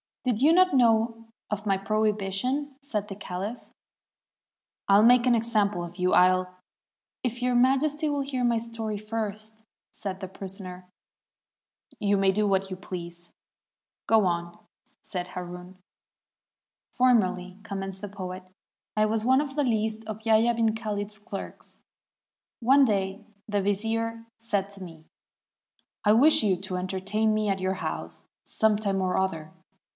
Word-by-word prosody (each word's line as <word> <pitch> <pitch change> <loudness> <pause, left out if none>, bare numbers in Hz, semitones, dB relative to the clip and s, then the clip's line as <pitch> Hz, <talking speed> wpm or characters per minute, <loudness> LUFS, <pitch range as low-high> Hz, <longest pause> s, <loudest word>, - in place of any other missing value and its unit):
"Did 245 -4 0
you 300 +4 +6
not 365 -1 +5
know 230 -2 +3 0.3
of 210 0 -3
my 195 -1 +3
prohibition?" 215 +7 -1
said 215 -7 -3
the 195 - -7
caUph. 200 +4 -6 1.2
"I'll 200 +1 +6
make 245 +1 +6
an 245 -1 +4
example 210 -5 +1
of 175 +1 -9
you; 180 0 +1
I'll 185 0 +4 0.2
— - - -68
" - - -67
"If 245 -1 -2
Your 250 0 +1
Majesty 275 +5 +2
will 285 -1 0
hear 270 -2 -2
my 240 -1 +3
story 225 -2 -4
first," 215 0 -5 0.3
said 190 -2 -6
the 190 - -5
prisoner, 185 -1 -8 1.1
"you 205 -1 +2
may 195 0 +4
do 210 +2 +1
what 195 -1 +1
you 185 - -4
please." 175 -2 -8 0.4
" - - -68
Go 220 -3 +5
on," 170 -1 -2 0.4
said 180 -1 -5
Haroun. 180 0 -8 1.1
"Formerly," 190 -7 +2
commenced 195 -2 -5
the 205 - -4
poet, 185 -2 -7 0.5
"I 215 - +4
was 215 0 0
one 260 +2 +5
of 280 -2 -5
the 295 - +2
least 220 -2 -1
of 215 0 -7
Yahya 225 +1 +4
'bn 225 -1 +1
Khalid's 210 -1 -4
clerks. 200 -1 -9 0.8
One 270 +4 +5
day 200 -2 -1 0.2
the 205 -2 0
vizier 225 +3 -1
said 205 -4 -2
to 195 -1 -9
me, 165 -3 -12 1.0
'I 210 - +6
wish 275 +3 +6
you 195 -4 +2
to 180 +1 -5
entertain 195 +4 0
me 215 -1 0
at 195 -1 0
your 185 +1 -1
house - - -5 0.2
some 220 -1 +2
time 200 -2 -1
or 185 -1 0
other.' 165 -5 -2
210 Hz, 150 wpm, -27 LUFS, 190-230 Hz, 1.2 s, you